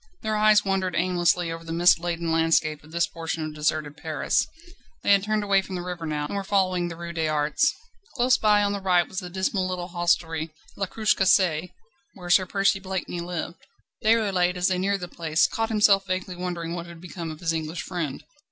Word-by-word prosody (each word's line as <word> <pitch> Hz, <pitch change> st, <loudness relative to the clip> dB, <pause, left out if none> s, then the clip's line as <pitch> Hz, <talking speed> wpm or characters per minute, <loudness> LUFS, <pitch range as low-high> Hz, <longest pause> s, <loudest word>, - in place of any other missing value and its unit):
Their 215 Hz, 0 st, -1 dB
eyes 215 Hz, -1 st, +4 dB
wandered 190 Hz, -2 st, 0 dB
aimlessly 175 Hz, -1 st, +1 dB
over 165 Hz, 0 st, -6 dB
the 165 Hz, -, -7 dB
mist 170 Hz, +1 st, +5 dB
laden 170 Hz, -1 st, -2 dB
landscape 160 Hz, -2 st, +2 dB
of 155 Hz, -, -16 dB
this 170 Hz, +1 st, +2 dB
portion 165 Hz, -1 st, -4 dB
of 155 Hz, -, -6 dB
deserted 150 Hz, -1 st, -1 dB
Paris. 155 Hz, -3 st, 0 dB, 0.6 s
They -, -, +3 dB
had 200 Hz, -1 st, +6 dB
turned 215 Hz, +1 st, -1 dB
away 200 Hz, -1 st, +3 dB
from 190 Hz, 0 st, -7 dB
the 175 Hz, -, -4 dB
river 175 Hz, -2 st, -5 dB
now, 150 Hz, -1 st, -2 dB
and 150 Hz, -, -5 dB
were 200 Hz, -, -2 dB
following 185 Hz, -3 st, +1 dB
the 170 Hz, -, -6 dB
Rue 170 Hz, 0 st, -7 dB
des 160 Hz, -2 st, -1 dB
Arts. 150 Hz, -1 st, +2 dB, 0.4 s
Close 255 Hz, 0 st, +4 dB
by 210 Hz, -1 st, +3 dB
on 205 Hz, 0 st, +1 dB
the 200 Hz, -, -4 dB
right 180 Hz, -2 st, +3 dB
was 190 Hz, -, -4 dB
the 180 Hz, -, -7 dB
dismal 190 Hz, +1 st, -1 dB
little 180 Hz, -1 st, -4 dB
hostelry, 170 Hz, -2 st, 0 dB, 0.3 s
"La 195 Hz, -, -2 dB
Cruche 215 Hz, +3 st, +1 dB
Cassée," 180 Hz, -3 st, +3 dB, 0.5 s
where 175 Hz, -2 st, -5 dB
Sir 185 Hz, +1 st, +5 dB
Percy 195 Hz, 0 st, +2 dB
Blakeney 190 Hz, -2 st, -4 dB
lived. 175 Hz, 0 st, -5 dB, 0.4 s
Déroulède, 200 Hz, -5 st, +2 dB
as 180 Hz, +1 st, +1 dB
they 185 Hz, -1 st, 0 dB
neared 195 Hz, +1 st, 0 dB
the 180 Hz, -, -4 dB
place, 160 Hz, -2 st, +1 dB
caught 225 Hz, 0 st, -1 dB
himself 205 Hz, -3 st, +4 dB
vaguely 185 Hz, 0 st, -3 dB
wondering 175 Hz, -2 st, -4 dB
what 170 Hz, 0 st, -5 dB
had 170 Hz, -1 st, -11 dB
become 175 Hz, -1 st, -7 dB
of 155 Hz, -1 st, -8 dB
his 165 Hz, -2 st, 0 dB
English 160 Hz, +1 st, -4 dB
friend. 165 Hz, -7 st, -4 dB
180 Hz, 210 wpm, -25 LUFS, 165-195 Hz, 0.6 s, had